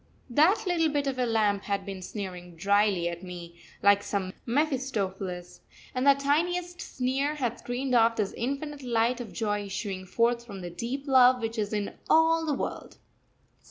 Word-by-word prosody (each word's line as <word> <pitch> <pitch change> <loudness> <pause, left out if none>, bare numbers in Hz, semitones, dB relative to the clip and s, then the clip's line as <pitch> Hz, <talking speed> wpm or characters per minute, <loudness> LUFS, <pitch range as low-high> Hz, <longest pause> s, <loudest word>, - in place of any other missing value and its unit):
That 345 - +4
little 335 -3 +2
bit 290 -1 0
of 265 -2 -2
a 250 - +2
lamp 210 -3 +1
had 200 -1 -2
been 195 -2 -6
sneering 180 -3 -7
drily 200 0 +2
at 170 0 -4
me, 175 -2 -9 0.2
like 200 0 +6
some 190 -2 -3
Mephistopheles: 205 - -2 0.3
and 255 +1 0
that 280 0 +5
tiniest 350 +5 0
sneer 270 +3 -1
had 245 -5 -2
screened 255 +2 -3
off 230 -1 +5
this 210 -3 -1
infinite 280 +4 -4
light 240 0 +1
of 225 -5 -8
joy 205 -2 -1
issuing 195 -1 -5
forth 235 +3 +1
from 200 -5 -9
the 175 -1 -6
deep 250 +9 -4
love 255 -1 +6
which 225 -1 -3
is 205 -1 -1
in 210 -2 -3
all 325 0 +4
the 295 - +1
world. - - -5
230 Hz, 170 wpm, -28 LUFS, 200-275 Hz, 0.3 s, like